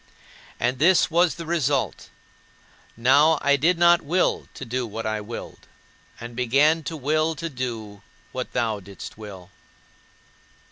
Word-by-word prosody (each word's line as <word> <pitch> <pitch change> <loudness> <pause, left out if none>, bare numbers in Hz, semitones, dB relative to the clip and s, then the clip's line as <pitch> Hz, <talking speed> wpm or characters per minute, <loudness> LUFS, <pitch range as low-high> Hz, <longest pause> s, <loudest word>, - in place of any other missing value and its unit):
And 125 +2 0
this 170 +3 +4
was 170 0 +3
the 170 - -7
result: 145 -5 -1 0.9
now 140 +7 +5
I 140 0 +4
did 165 +6 +2
not 175 0 +5
will 175 +5 0
to 135 - -7
do 125 +1 -2
what 110 +1 -6
I 110 -1 -2
willed, 115 +3 -9 0.5
and 120 0 -8
began 140 +7 +3
to 160 - -4
will 155 +3 0
to 165 +2 -5
do 115 -7 -6 0.3
what 130 0 -5
thou 115 -4 0
didst 100 0 -10
will. 95 -4 -11
135 Hz, 140 wpm, -24 LUFS, 115-160 Hz, 0.9 s, now